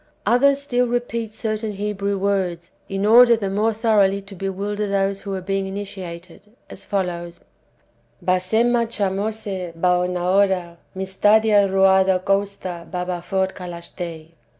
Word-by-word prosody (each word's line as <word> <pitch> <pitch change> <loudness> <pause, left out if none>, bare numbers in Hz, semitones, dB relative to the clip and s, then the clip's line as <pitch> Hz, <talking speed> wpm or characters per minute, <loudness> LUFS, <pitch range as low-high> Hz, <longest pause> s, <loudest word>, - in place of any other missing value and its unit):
Others 275 +6 +4
still 250 -3 +1
repeat 235 -2 -3
certain 215 -1 -3
Hebrew 200 0 -2
words, 185 -3 -1 0.2
in 195 +1 -1
order 235 +2 +7
the 200 -3 -3
more 215 +3 +1
thoroughly 210 -3 +2
to 195 +1 -12
bewilder 200 +2 -3
those 195 0 0
who 200 -1 -5
are 190 - -4
being 195 +1 -2
initiated, 185 -3 -7 0.3
as - - -9
follows: 175 -3 -3 0.8
"Basema, 225 +6 +1
Chamosse, 200 -3 -2
Baoenaora, 180 0 +1 0.2
Mistadia, 205 +2 +3
Ruada, 190 -1 +4
Kousta, 195 -3 -2
Babaphor, 180 +1 -2
Kalachthei." 170 -2 -8
195 Hz, 115 wpm, -21 LUFS, 185-210 Hz, 0.8 s, order